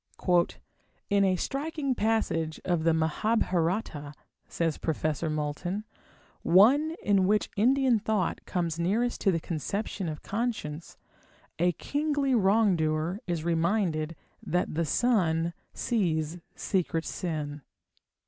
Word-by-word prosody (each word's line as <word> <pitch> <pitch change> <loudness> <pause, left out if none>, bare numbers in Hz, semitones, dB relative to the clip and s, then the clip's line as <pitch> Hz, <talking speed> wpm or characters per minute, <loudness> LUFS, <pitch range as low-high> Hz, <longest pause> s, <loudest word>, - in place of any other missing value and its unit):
"In 200 0 +4
a 190 -1 +3
striking 280 - -2
passage 210 -9 0
of 175 -3 +1
the 165 - +5
Mahabharata" 165 -2 0 0.3
says 165 -3 -1
Professor 155 0 -1
Moulton, 155 +6 -2 0.6
"one 270 - +5
in 195 -2 +3
which 210 +1 +1
Indian 255 +2 +3
thought 210 -4 -1
comes 170 -3 -1
nearest 220 +8 0
to 195 - +4
the 165 - 0
conception 180 +3 -3
of 150 -1 -7
conscience, 200 -9 -3 0.6
a 175 +1 +3
kingly 285 - 0
wrongdoer 190 -6 +2
is 170 -3 -2
reminded 165 -2 0 0.3
that 180 +2 -1
the 165 +2 0
sun 170 - +2 0.2
sees 170 -7 -1 0.2
secret 170 -4 -1
sin." 150 -4 -4
180 Hz, 110 wpm, -28 LUFS, 160-220 Hz, 0.6 s, the